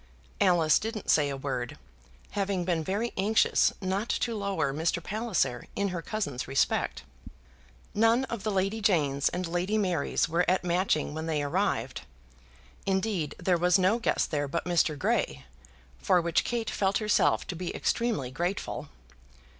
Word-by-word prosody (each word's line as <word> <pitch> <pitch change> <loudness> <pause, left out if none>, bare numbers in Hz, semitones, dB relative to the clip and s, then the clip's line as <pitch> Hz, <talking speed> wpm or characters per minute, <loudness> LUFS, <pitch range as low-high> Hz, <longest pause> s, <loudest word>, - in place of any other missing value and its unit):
Alice 170 -5 +4
didn't 220 -1 -2
say 145 -2 +3
a 140 - -3
word, 130 -3 -4 0.5
having 195 -3 -1
been 170 -3 0
very 205 +8 -2
anxious 210 +4 +3
not 195 +4 -2
to 235 - 0
lower 200 -9 -1
Mr. 160 +4 0
Palliser 215 - -1
in 200 0 0
her 175 -2 -4
cousin's 185 - -3
respect. 130 - 0 0.9
None 225 +4 +3
of 235 -5 -4
the 215 - -2
Lady 195 +2 0
Janes 145 -9 +2
and 180 +1 -3
Lady 175 +5 -1
Marys 180 -8 +1
were 170 +2 +1
at 185 0 +2
Matching 175 -4 +1
when 160 +1 -4
they 150 -2 0
arrived. 145 - -1 0.9
Indeed, 190 -4 0
there 180 -1 +1
was 180 0 +4
no 190 +5 +2
guest 225 - 0
there 145 -2 0
but 165 +4 -3
Mr. 170 -4 +2
Grey, 65 - -1 0.5
for 180 - +3
which 170 0 +1
Kate 230 -2 -2
felt 195 +1 +1
herself 215 -1 +2
to 180 - -5
be 175 +1 -4
extremely 225 - -1
grateful. 175 +8 -3
180 Hz, 155 wpm, -28 LUFS, 155-205 Hz, 0.9 s, Alice